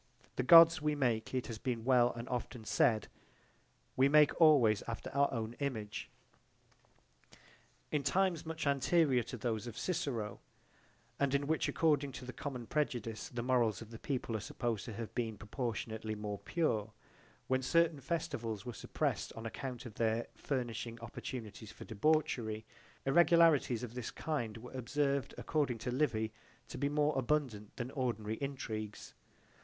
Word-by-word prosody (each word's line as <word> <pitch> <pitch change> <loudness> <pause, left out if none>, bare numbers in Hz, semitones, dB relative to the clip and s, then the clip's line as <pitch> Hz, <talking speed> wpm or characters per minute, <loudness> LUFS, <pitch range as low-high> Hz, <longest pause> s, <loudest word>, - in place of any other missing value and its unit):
The - - 0
Gods 165 +3 +9
we 150 0 +1
make, 120 -6 0
it 130 - 0
has 115 -3 -6
been 120 -2 -3
well 125 -2 +5
and 120 +1 -7
often 125 -2 -4
said, 110 -1 +2 0.9
we 135 +1 +5
make 150 +2 +5
always 130 -10 +6
after 115 - -5
our 140 0 +2
own 115 -2 -3
image. 110 -8 -3 1.8
In 150 - +1
times 180 +2 +1
much 160 -1 -4
anterior 140 -1 +3
to 120 +2 -6
those 115 0 -2
of 115 -1 -7
Cicero 115 - -2 0.8
and 140 -1 +2
in 140 0 +1
which 155 +1 +1
according 145 -4 +2
to 125 - -8
the 125 - -7
common 135 -4 -5
prejudice 120 -4 -2
the 120 -4 -4
morals 120 -5 +2
of 115 -1 -10
the 115 - -9
people 125 -5 -2
are - - 0
supposed 115 +1 -3
to 115 - -6
have 115 +1 -6
been 115 -3 -2
proportionately 110 -1 -4
more 105 -1 -4
pure, 110 -10 -1 0.5
when 130 0 +1
certain 165 +2 +3
festivals 115 - -3
were 120 - -5
suppressed - - -2
on 115 - -8
account 125 +2 -5
of 115 - -8
their 115 +1 0
furnishing 120 -3 -3
opportunities 110 -2 -7
for - - -11
debauchery, 110 -3 0 0.4
irregularities 160 -5 +5
of 120 -2 -6
this 125 -2 -4
kind 120 -9 -3
were 125 +2 -10
observed 140 +1 -1
according 145 -6 0
to 120 +2 -4
Livy 110 -5 0 0.4
to - - -6
be 140 +1 +1
more 150 +1 +2
abundant 125 -6 -1
than 125 +1 -4
ordinary 110 -5 -2
intrigues. 110 -7 -5
125 Hz, 155 wpm, -34 LUFS, 110-145 Hz, 1.8 s, Gods